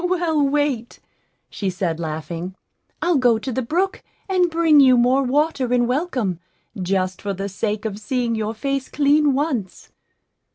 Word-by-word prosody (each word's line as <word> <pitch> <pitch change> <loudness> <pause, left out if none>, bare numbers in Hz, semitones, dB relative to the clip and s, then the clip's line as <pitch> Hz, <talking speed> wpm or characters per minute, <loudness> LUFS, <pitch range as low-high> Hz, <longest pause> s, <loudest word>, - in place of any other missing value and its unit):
"Well, 345 -4 +1
wait," 280 -4 0 0.5
she 195 - -3
said, 180 -3 -2
laughing; 165 +3 -5 0.5
"I'll 345 -3 +3
go 245 -3 +4
to 260 +4 -5
the 260 - -1
brook 350 +10 -1 0.3
and 365 -2 +2
bring 325 -2 +4
you 260 -3 +6
more 250 +3 +3
water 275 -1 0
in 245 -1 +3
welcome, 250 - -1 0.4
just 185 0 -1
for 200 -1 -3
the 195 +2 -4
sake 210 +2 -3
of 210 -2 -4
seeing 240 +2 -1
your 220 0 -2
face 275 +3 -2
clean 295 0 +3
once." 265 - -3
250 Hz, 155 wpm, -21 LUFS, 205-295 Hz, 0.5 s, you